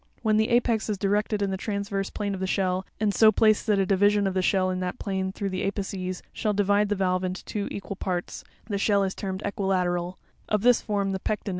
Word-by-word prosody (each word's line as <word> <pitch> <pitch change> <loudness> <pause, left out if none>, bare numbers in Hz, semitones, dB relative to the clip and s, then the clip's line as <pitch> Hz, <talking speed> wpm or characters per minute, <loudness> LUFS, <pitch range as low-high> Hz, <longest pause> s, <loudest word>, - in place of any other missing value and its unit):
When 215 -1 +3
the 220 0 +2
apex 235 -2 +2
is 210 - -1
directed 205 +1 0
in 195 - 0
the 190 - -2
transverse 200 0 -3
plane 205 -1 -3
of 190 - -4
the 190 - -2
shell, 185 -1 0
and 210 -1 +1
so 220 +1 +6
placed, 215 +1 +3
that 210 -2 +3
a 195 - +2
division 205 +1 +3
of 195 - 0
the 185 - +1
shell 185 0 +2
in 185 - -2
that 180 -1 -3
plane 190 -2 -2
through 200 0 -3
the 185 - -2
apices 190 -2 -3
shall 215 - -1
divide 205 +1 +2
the 205 - +1
valve 185 -1 0
into 185 +1 -4
two 205 -2 -3
equal 200 -1 -6
parts, 180 -2 -3 0.2
the 200 -3 -2
shell 200 -1 +3
is 190 0 -1
termed 190 -1 -5
equilateral; 185 -3 -1 0.3
of 210 -1 +1
this 245 -1 +5
form 200 -2 -1
the 190 - -2
Pecten 210 +3 -2
(fig. - - -3
200 Hz, 240 wpm, -26 LUFS, 190-210 Hz, 0.3 s, so